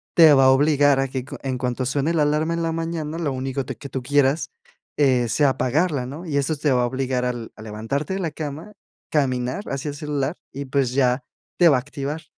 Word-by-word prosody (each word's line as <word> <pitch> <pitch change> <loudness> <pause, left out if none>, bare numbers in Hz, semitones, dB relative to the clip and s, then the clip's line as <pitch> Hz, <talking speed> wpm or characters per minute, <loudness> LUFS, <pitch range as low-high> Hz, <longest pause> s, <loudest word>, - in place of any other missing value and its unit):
te 160 -3 +8
va 135 -1 +5
a - - +7
obligar 145 0 +4
a 135 - +1
que 130 -1 -3
cu - - -8
en 130 -2 -2
cuanto 125 0 -2
suene 140 +5 0
la 155 - +3
alarma 150 +3 +1
en 170 - -2
la 165 - 0
mañana, 165 -1 -3
lo 155 -4 -1
único 135 +1 -3
te - - -5
que 140 - -8
tú 130 0 -4
quieras, 145 +3 +2 0.5
eh, 130 -5 +3
sea 145 +5 +3
apagarla, 140 +1 0
¿no? 150 +7 -8
Y 150 -4 -1
estos 140 +2 0
te 150 - +2
va 125 -1 +3
a - - +2
obligar 130 0 -1
al 120 -2 -4
a - - -13
levantarte 115 - -3
de - - -3
la 165 -4 -2
cama, 155 +6 -6 0.4
caminar 130 +4 0
hacia 140 +2 -3
el 145 - -6
celular 145 0 -2 0.2
y, 140 +1 -5
pues, 135 -2 0
ya 130 -1 +2 0.4
te 175 -2 +7
va 140 - +5
a - - +1
activar. 145 +3 -5
140 Hz, 235 wpm, -23 LUFS, 130-155 Hz, 0.5 s, te